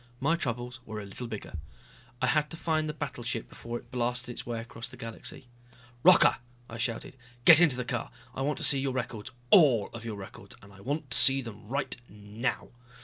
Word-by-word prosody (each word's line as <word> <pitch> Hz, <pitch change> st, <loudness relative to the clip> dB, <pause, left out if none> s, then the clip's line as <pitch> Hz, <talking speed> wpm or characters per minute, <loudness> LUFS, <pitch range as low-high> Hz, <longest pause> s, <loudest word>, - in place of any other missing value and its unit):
My 155 Hz, +5 st, +2 dB
troubles 125 Hz, -4 st, -4 dB
were 110 Hz, -2 st, -6 dB
a 105 Hz, -, -7 dB
little 110 Hz, +5 st, -7 dB
bigger. 105 Hz, -6 st, -7 dB, 0.7 s
I -, -, +5 dB
had 150 Hz, +3 st, +2 dB
to 165 Hz, -, -7 dB
find 155 Hz, -2 st, 0 dB
the -, -, -3 dB
battleship 125 Hz, -6 st, -4 dB
before 120 Hz, 0 st, -6 dB
it 120 Hz, -, -15 dB
blasted 125 Hz, -1 st, -1 dB
its 120 Hz, -, -8 dB
way 120 Hz, -1 st, -3 dB
across 115 Hz, 0 st, -8 dB
the 130 Hz, -, -13 dB
galaxy. 115 Hz, +2 st, -7 dB, 0.5 s
"Rocca!" 180 Hz, -3 st, +6 dB, 0.3 s
I 115 Hz, -, -8 dB
shouted. 115 Hz, +2 st, -3 dB, 0.3 s
"Get 165 Hz, 0 st, +10 dB
into 150 Hz, -8 st, +5 dB
the 125 Hz, -, -3 dB
car. 120 Hz, -1 st, -3 dB, 0.2 s
I -, -, -5 dB
want 145 Hz, +2 st, 0 dB
to -, -, -4 dB
see 140 Hz, -, +4 dB
your 135 Hz, -1 st, -1 dB
records 115 Hz, -4 st, -4 dB, 0.2 s
all 135 Hz, -, +6 dB
of 115 Hz, -1 st, -8 dB
your 115 Hz, -2 st, -5 dB
records 100 Hz, -1 st, -10 dB
and 100 Hz, 0 st, -15 dB
I 100 Hz, -, -15 dB
want 140 Hz, +3 st, -3 dB
to -, -, +3 dB
see 135 Hz, 0 st, +6 dB
them 110 Hz, -2 st, -10 dB
right 140 Hz, +5 st, -2 dB
now." 105 Hz, +5 st, -4 dB
120 Hz, 205 wpm, -29 LUFS, 115-140 Hz, 0.7 s, Get